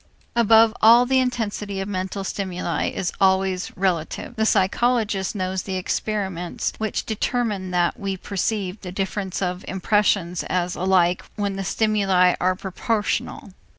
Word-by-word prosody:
Above 225 -1 +5
all 235 +3 +7
the 260 +1 +3
intensity 215 -5 -2
of 195 - -3
mental 190 0 -3
stimuli 180 -4 -2
is 180 - -3
always 190 -1 +2
relative. 180 +4 -2
The 220 -1 +1
psychologist 210 0 +1
knows 185 -1 -2
the 190 - -5
experiments 185 -2 -2
which 220 -1 -2
determine 215 -3 -1
that 175 -1 0
we 195 -1 -3
perceive 200 +1 -3
the 180 - -7
difference 195 0 -3
of 180 0 -3
impressions 190 -3 +1
as 180 -1 -1
alike 180 -1 +2
when 200 -2 -2
the 195 - -3
stimuli 195 -3 +2
are 185 +1 +2
proportional. 205 +2 -2
195 Hz, 135 wpm, -23 LUFS, 185-215 Hz, -, all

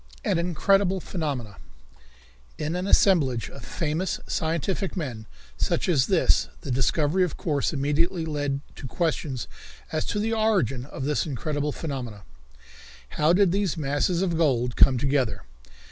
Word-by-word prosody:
An - - +2
Incredible 190 +2 +2
Phenomenon. 140 - -4 1.0
In 155 +3 -2
an 180 +2 -2
assemblage 140 - +3
of - - -11
famous 165 +3 -2
scientific 170 +5 -2
men 120 -10 -4 0.3
such - - 0
as 145 -8 +3
this 185 -4 +3
the 140 - -5
discovery 150 +7 +2
of 180 - -2
course 145 -4 0
immediately 160 +4 0
led 145 -3 -2 0.2
to 135 - -6
questions 145 -4 -2 0.4
as 155 -1 0
to - - -2
the 220 +2 0
origin 195 - +1
of 135 -1 -6
this 150 +2 0
incredible 145 +2 -2
phenomenon. 125 - -5 0.9
How 155 +2 +2
did 185 0 +4
these 195 -3 0
masses 150 +5 0
of 170 -4 0
gold 125 -6 +1
come 130 -2 +6
together? 130 -6 0
150 Hz, 140 wpm, -26 LUFS, 135-180 Hz, 1.0 s, come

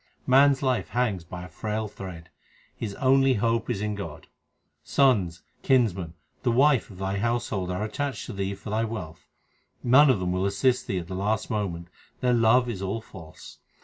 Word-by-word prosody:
Man 135 +2 +6
s 135 +2 -7
life 130 -2 +1
hangs 110 -8 0
by 90 +1 -8
a - - -8
frail 110 +3 -3
thread; 90 -5 -9 0.4
his 105 -3 -5
only 135 0 +4
hope 115 +1 0
is 110 -5 -1
in 105 0 -1
God: 100 -1 -7 0.6
Sons, 100 -11 +2 0.2
kinsmen, 100 - +1 0.3
the 125 - +1
wife 135 +2 +3
of 95 - -12
thy 95 +1 -2
household 110 -4 -1
are 90 +3 -2
attached 135 +3 -3
to - - -7
thee 100 0 -3
for 100 +2 -9
thy 110 +1 +1
wealth. 85 -9 -6 0.6
None 135 +4 +6
of 125 -7 +3
them 90 -1 -1
will 90 +2 0
assist 125 +5 +1
thee 95 - -1
at 85 -2 -4
the 95 - -6
last 105 +3 -1
moment; 90 -6 -3 0.3
their 125 -1 +2
love 120 +2 +4
is 110 -6 -4
all 100 +4 -2
false. 80 -7 -13
105 Hz, 185 wpm, -26 LUFS, 95-125 Hz, 0.6 s, Man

